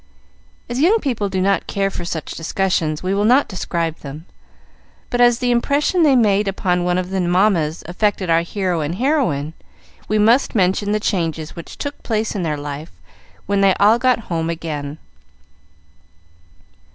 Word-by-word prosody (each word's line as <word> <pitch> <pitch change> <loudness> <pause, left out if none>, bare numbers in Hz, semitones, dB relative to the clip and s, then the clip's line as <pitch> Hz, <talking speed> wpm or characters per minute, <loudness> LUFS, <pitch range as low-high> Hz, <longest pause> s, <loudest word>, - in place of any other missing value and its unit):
As 240 +1 -3
young 365 +10 +4
people 235 - -2
do 190 -1 -2
not 195 +1 +1
care 195 0 -1
for 175 - -5
such 165 -2 -4
discussions, 165 -2 -1
we 185 +1 0
will 200 +1 +1
not 250 +6 +4
describe 170 -4 -3
them, 150 +3 -9 0.9
but 245 - +1
as 240 -1 +5
the 245 0 0
impression 285 +8 +1
they 290 -4 +5
made 210 -4 +3
upon 180 -2 0
one 180 0 +1
of 185 0 -3
the 190 -1 0
mammas 175 -3 +1
affected 190 +2 -1
our 165 0 +3
hero 180 -1 -2
and 150 +3 -2
heroine, 230 - 0 0.5
we 215 - +1
must 230 +5 +3
mention 195 +1 +1
the 215 - +1
changes 165 -6 -2
which 170 - -10
took 285 0 -5
place 220 -1 -1
in 200 - -3
their 155 -3 -1
life 145 +2 -6 0.5
when 200 0 +1
they 195 -1 +4
all 215 +3 +4
got 255 -2 +2
home 165 -5 -3
again. 155 -3 -5
190 Hz, 165 wpm, -19 LUFS, 165-220 Hz, 0.9 s, as